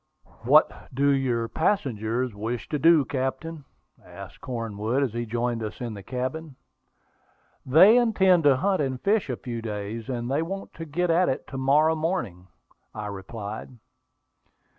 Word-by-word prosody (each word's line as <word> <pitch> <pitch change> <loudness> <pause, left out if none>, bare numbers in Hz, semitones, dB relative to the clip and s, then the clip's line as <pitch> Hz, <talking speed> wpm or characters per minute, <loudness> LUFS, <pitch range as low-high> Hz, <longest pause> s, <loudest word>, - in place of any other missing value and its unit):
"What - - +4
do 140 +2 +2
your 125 -4 0
passengers 125 - -1
wish 110 -1 -4
to 150 - -1
do, 165 -3 +5
captain?" 140 +3 -4 0.4
asked 95 +2 -12
Cornwood, 115 0 -2
as 125 -6 -2
he 120 0 -3
joined 120 +1 -1
us 110 -1 -6
in 120 -3 -4
the 100 - -8
cabin. 130 +7 -5 1.1
"They 185 - +7
intend 190 -8 +3
to 140 -2 +6
hunt 190 +4 +1
and 130 -2 -2
fish 205 - +1
a 125 - -1
few 120 -3 -6
days; 110 +2 -5
and 120 -1 -3
they 145 +3 +1
want 195 +4 -5
to 165 - -7
get 170 +3 0
at 175 +2 +3
it 130 - -2
to 135 - -6
morrow 150 +4 +4
morning," 155 - -3 0.5
I 105 -1 -5
replied. 105 +4 -7
130 Hz, 155 wpm, -25 LUFS, 115-160 Hz, 1.1 s, They